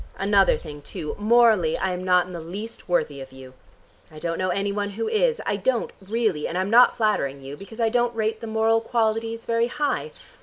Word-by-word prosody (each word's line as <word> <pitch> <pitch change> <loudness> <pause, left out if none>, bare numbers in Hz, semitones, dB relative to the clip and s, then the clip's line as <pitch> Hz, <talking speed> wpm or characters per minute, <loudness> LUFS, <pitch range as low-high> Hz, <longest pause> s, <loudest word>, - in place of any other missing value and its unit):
Another 195 0 +3
thing, 145 -1 -10
too: 150 +1 -6
morally, 215 -6 +4
I 190 - -1
am 180 0 -4
not 180 -1 +3
in 180 - -10
the 170 - -5
least 200 +7 -8
worthy 145 -5 0
of 135 0 -10
you. 130 -1 -12 0.6
I 155 - -13
don't 165 +1 -3
know 185 0 0
any 200 +2 -1
one 205 0 -2
who 220 +3 -4
is. 475 +2 +1
I 205 - 0
don't 235 +4 0
really, 205 -5 -1
and 175 - -4
I'm 190 +2 -1
not 245 +2 +6
flattering 210 - 0
you, 135 +1 -8
because 200 +8 -12
I 225 -1 +2
don't 240 0 +1
rate 220 0 -1
the 230 - -6
moral 225 +1 +2
qualities 225 0 -1
very 230 0 +1
high. 295 - -2
205 Hz, 215 wpm, -24 LUFS, 175-230 Hz, 0.6 s, not